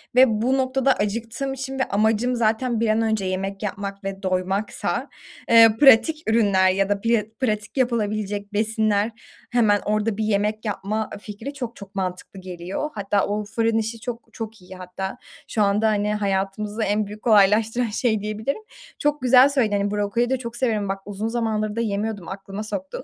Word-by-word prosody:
ve 255 +1 +8
bu 230 +4 +1
noktada 265 0 +2
acıktığım 230 +6 -3
için 270 0 -5
ve - - +3
amacım 220 +4 +1
zaten 230 +1 +1
bir 230 -1 +1
an 215 +1 +2
önce 220 -3 0
yemek 195 +2 -3
yapmak 200 0 -5
ve 195 0 -5
doymaksa, 185 +2 -1 0.4
ııı, 225 -1 +7
pratik 295 +4 +5
ürünler 200 -4 +4
ya 195 +1 0
da 205 -1 +1
piya 230 -1 +2 0.2
pratik 215 -2 -2
yapılabilecek 210 -4 -1
besinler 215 0 +1 0.4
hemen 215 -4 +3
orada 215 0 0
bir 220 - -1
yemek 215 +1 0
yapma, 210 +1 -2
ııı, 205 - -7
fikri 210 +6 -7
çok 245 -4 -6
çok 200 0 -12
mantıklı 185 0 -4
geliyor. 185 - -5
Hatta 200 -1 0
o 210 +1 -1
fırın 225 +1 0
işi 225 +1 -2
çok 240 0 -7
çok 225 -3 -7
iyi 185 +1 -12
hatta 185 +4 -6 0.3
şu 215 - -1
anda 205 +2 +2
hani 210 0 +1
hayatımızı 205 +1 -1
en 210 +1 +1
büyük 210 +2 -10
kolaylaştıran 220 +2 +4
şey 220 0 0
diyebilirim. 215 - -3 0.4
Çok 295 -1 0
güzel 255 +2 +6
söyledin, 230 -7 +1
hani, 200 0 -1
brokoli 210 +4 0
de 265 - +1
çok 235 -2 -7
severim 220 -5 0
bak 195 0 -2
uzun 205 +2 -4
zamandır 220 -2 -1
da 230 - 0
yemiyordum, 205 -3 -2
aklıma 195 +2 -6
soktun. 200 +2 -5
215 Hz, 175 wpm, -23 LUFS, 200-230 Hz, 0.4 s, ve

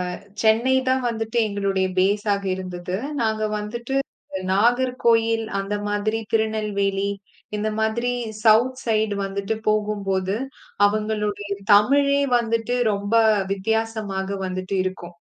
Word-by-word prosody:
அ - - -9 0.3
சென்னை 230 +4 +4
தான் 260 -1 +2
வந்துட்டு 225 0 -3
எங்களுடைய 195 -2 0
பேஸா 205 +2 +2 0.2
இருந்தது. 180 0 -5 0.2
நாங்க 220 -1 0 0.2
வந்துட்டு 235 +5 -4 0.6
நாகர்கோயில் 230 0 +2 0.2
அந்த 195 +1 -3 0.2
மாதிரி 215 +2 0
திருநெல்வேலி 200 -3 0 0.4
இந்த 210 +1 -1
மாதிரி 235 +3 0 0.3
சவுத் 235 +4 +4
சைட் 220 -2 +1
வந்துட்டு 200 +2 -3
போகும்போது 200 -3 0 0.5
அவங்களுடைய 210 -1 -1 0.2
தமிழே 280 +6 +4 0.2
வந்துட்டு 230 +1 -1 0.2
ரொம்ப 200 +2 -3 0.4
வித்தியாசமாக 200 -1 -2
வந்துட்டு 185 +1 -3
இருக்கும். 185 -2 -5
215 Hz, 100 wpm, -23 LUFS, 200-225 Hz, 0.6 s, சென்னை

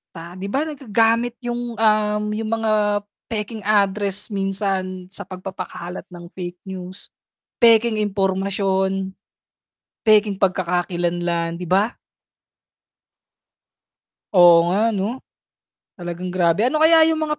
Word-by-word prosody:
Ah, 170 +2 -9
'di 190 +1 -5
ba, 270 +9 0
nagagamit 235 -5 0
yung, 240 -1 -4
um, 210 -1 +2
yung 215 +1 -3
mga, 210 -2 +1 0.2
pekeng 220 0 -4
address 205 0 0
minsan 195 -2 -2
sa - - -6
pagpapakalat 185 -1 -7
ng 175 -1 -12
fake 180 -1 -8
news, 190 0 -8 0.5
pekeng 230 -2 +5
impormasyon. 195 -1 0 0.9
Pekeng 215 -2 +4
pagkakakilan 175 -2 0
lang 170 -1 -1
'di 175 - -7
ba? 200 +5 +2 2.4
Oo 170 -1 +7
nga 210 +5 +2
'no, 215 +5 -3 0.7
talagang 175 0 -6
grabe, 180 +4 +2
ano 305 +4 +1
kaya 320 0 +7
yung 320 -1 +1
mga 300 -1 -2
200 Hz, 110 wpm, -21 LUFS, 185-220 Hz, 2.4 s, Oo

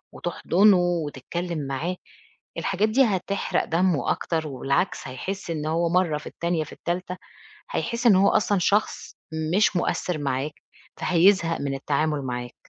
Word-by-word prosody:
وتحضنُه 190 +3 +3
وتتكلِّم 170 -1 -2
معاه، 155 +7 -2 0.6
الحاجات 200 +3 0
دي 265 +5 +4
هتحرق 200 -2 -1
دمُه 170 -4 +1
أكتر، 160 -2 -2
وبالعكس 140 +5 -1
هيحِسّ 185 +8 -5
إن 155 -2 -3
هو 165 +2 +1
مَرّة 170 -3 +2
في - - -11
التانية 170 -2 -2
في 150 - -11
التالتة، 180 +1 -4 0.5
هيحِسّ 235 - 0
إن 210 - +7
هو 195 +1 +5
أصلًا 205 -2 +2
شخص 205 +4 0 0.4
مش 205 -1 +3
مؤثّر 175 -1 -1
معاك، 140 +1 -2 0.5
فهيزهق 175 -1 +3
من 140 -1 -2
التعامُل 150 +2 0
معاك، 125 -1 -5
170 Hz, 135 wpm, -25 LUFS, 150-190 Hz, 0.6 s, إن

